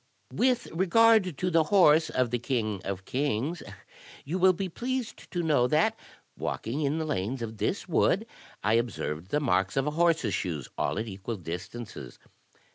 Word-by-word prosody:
*' - - -43
With 250 -1 +2
regard 190 -1 +4
to 180 +3 -1
the 165 -2 +4
horse 160 -3 +5
of 125 -2 0
the 120 - 0
king 110 -6 -2
of 95 -1 -5
kings, 140 +4 -1 0.6
you 170 +7 -2
will 185 +1 +6
be 190 +2 -3
pleased 245 +6 -4
to 175 -2 -2
know 145 -6 +3
that, 160 - +2 0.4
walking 125 +8 -3
in 145 +1 0
the 160 - -2
lanes 125 -3 -2
of 110 -1 -6
this - - -2
wood, - - +2 0.4
I 105 +2 +2
observed 95 -8 -1
the 150 - +1
marks 95 -6 +1
of 135 - +2
a 150 - 0
horse's 165 -8 +2
shoes, 80 -8 -3
all - - -1
at 110 +2 -2
equal 100 +3 -5
distances. 95 +6 -7
140 Hz, 175 wpm, -28 LUFS, 110-170 Hz, 0.6 s, will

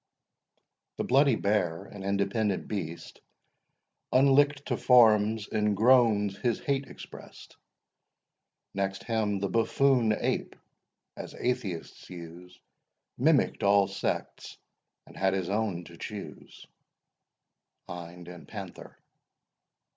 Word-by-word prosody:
The - - -1
bloody 135 0 +4
bear, 95 -5 0
an 100 0 -11
independent 100 +1 -1
beast, 85 -5 -6 0.9
Unlick'd 140 +2 +4
to - - -1
forms, 110 -3 +4
in 105 -2 0
groans 110 -3 +3
his 120 -3 0
hate 140 -1 -1
express'd— - - -12 1.2
Next 95 0 -2
him 110 -3 -1
the 100 +1 -1
buffoon 115 +2 +2
ape, - - -2 0.6
as - - -8
atheists 100 -9 -4
use, 90 +1 -11 0.6
Mimick'd - - +2
all 100 -1 +4
sects, 100 0 -4 0.5
and - - -16
had 95 0 +1
his 95 -1 -2
own 100 -5 -1
to 85 -1 -14
choose. 105 +2 -9 1.2
HIND 85 0 -9
AND 90 -1 -11
PANTHER. - - -9
100 Hz, 100 wpm, -28 LUFS, 95-115 Hz, 1.2 s, bloody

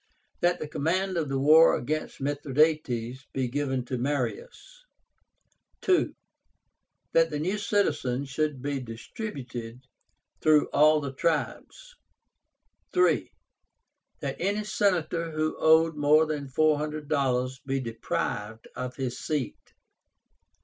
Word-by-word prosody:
That 175 0 +2
the 155 - -5
command 185 +6 -1
of 160 -4 -1
the 135 - -1
war 155 +4 +6
against 155 +5 -3
Mithradátes 140 -4 0
be 130 -2 -1
given 130 -1 -2
to 125 0 -3
Marius. 470 - -4 1.0
2. 370 -2 +2 1.0
That 165 0 +4
the 150 - -3
new 185 +8 -1
citizens 145 - 0
should 140 -1 -2
be 140 -1 -1
distributed 120 - -7 0.6
through 155 -1 +4
all 155 +1 +5
the 140 -2 -5
tribes. 170 - -2 1.0
3. 360 0 +2 0.9
That - - -3
any 205 +2 0
Senator 175 -5 0
who 155 0 -1
owed 160 0 +5
more 150 +2 +4
than 150 -2 -4
four 150 +3 +2
hundred 150 0 -4
dollars 130 -3 0
be 135 0 -1
deprived 115 -2 -4
of 125 +1 -5
his 130 -2 -4
seat. 145 -6 -4
150 Hz, 115 wpm, -27 LUFS, 130-160 Hz, 1.0 s, war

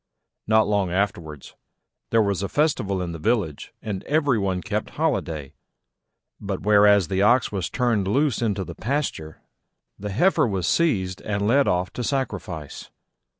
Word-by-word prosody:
Not 110 -1 +4
long 100 -4 0
afterwards 85 -7 -3 0.6
there 115 -1 +3
was 100 -2 -1
a 100 - -3
festival 115 - 0
in 85 - -4
the 85 - -7
village 95 -7 -1
and 100 -3 -4
every 145 -6 +2
one 95 -2 -1
kept 105 +1 -3
holiday: 85 - -2 0.9
but, 100 -2 -4
whereas 105 -2 +5
the 95 +2 0
Ox 120 +5 +3
was 95 -4 -3
turned 115 -6 0
loose 135 +3 +1
into 105 -4 0
the - - -8
pasture, 120 - -3 0.6
the 105 +1 -5
Heifer 150 - +3
was 95 -5 -2
seized 95 - +1
and 100 -1 -2
led 135 +5 +3
off 90 +1 0
to 125 - -4
sacrifice. 105 - -4
100 Hz, 150 wpm, -24 LUFS, 95-120 Hz, 0.9 s, whereas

